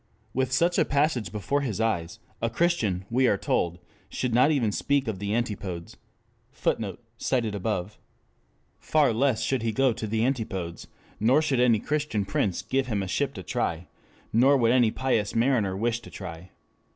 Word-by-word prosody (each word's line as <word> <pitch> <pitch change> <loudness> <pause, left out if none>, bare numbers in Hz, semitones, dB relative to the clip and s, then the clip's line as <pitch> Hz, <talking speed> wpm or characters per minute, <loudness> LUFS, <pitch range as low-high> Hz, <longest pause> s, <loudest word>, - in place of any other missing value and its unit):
With 130 -1 0
such 170 +7 +2
a - - +5
passage 140 -6 0
before 110 +8 -1
his 115 -7 -3
eyes, 85 -7 -1 0.2
a 115 - +1
Christian, 115 - 0
we 130 +2 +3
are 100 - +3
told, 85 -2 0 0.3
should 125 -2 -2
not 125 +5 +5
'even 130 -9 +2
speak 140 +5 0
of 105 -4 -3
the 100 +2 -1
Antipodes.'" 100 -7 -3 0.6
[Footnote: - - -2 0.3
Id.] 105 -6 0 0.9
Far 150 -6 +2
less 125 0 +1
should 130 -3 0
he 115 0 0
go 135 +1 +2
to 110 - -5
the 110 +2 +1
Antipodes; 95 -10 -3 0.3
nor 125 +7 +4
should 145 -5 +1
any 120 -2 +5
Christian 145 -9 -1
prince 95 -1 -1
give 135 -1 0
him 105 -5 -1
a - - -4
ship - - -1
to - - -7
try; 85 +2 -2 0.5
nor 135 +5 +5
would 115 -3 +3
any 120 -3 +4
pious 110 -4 -1
mariner 115 -6 +2
wish 115 +2 0
to - - -13
try. 90 -1 -8
115 Hz, 170 wpm, -26 LUFS, 100-130 Hz, 0.9 s, a